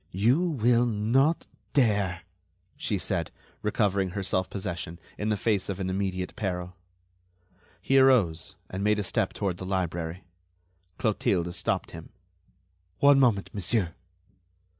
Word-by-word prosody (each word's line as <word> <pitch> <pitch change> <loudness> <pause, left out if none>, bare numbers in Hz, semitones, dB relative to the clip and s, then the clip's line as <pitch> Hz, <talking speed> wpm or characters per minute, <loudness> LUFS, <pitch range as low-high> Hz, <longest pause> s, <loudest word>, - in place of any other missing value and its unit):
"You 115 - +3
will 120 -8 +2
not 120 +9 +2 0.3
dare," 100 - +2 0.5
she 140 -8 -2
said, 90 -3 -2 0.3
recovering 100 -3 +1
her 100 - -1
self 95 -1 0
possession 90 -4 -5 0.2
in 105 - -2
the 105 - +1
face 105 -2 0
of 100 -1 -3
an 95 -1 -2
immediate 95 -1 -2
peril. 90 -3 -3 1.1
He 135 0 +4
arose, 100 -12 +3
and 95 +1 -4
made 105 0 +3
a 105 - -1
step 100 +1 0
toward 95 -4 -2
the - - -7
library. 90 -2 -2 0.7
Clotilde 90 -5 0
stopped 90 - -2
him: - - -10 0.9
"One 140 -1 +6
moment, 115 -7 +2
monsieur." 100 -3 0
100 Hz, 130 wpm, -27 LUFS, 90-115 Hz, 1.1 s, One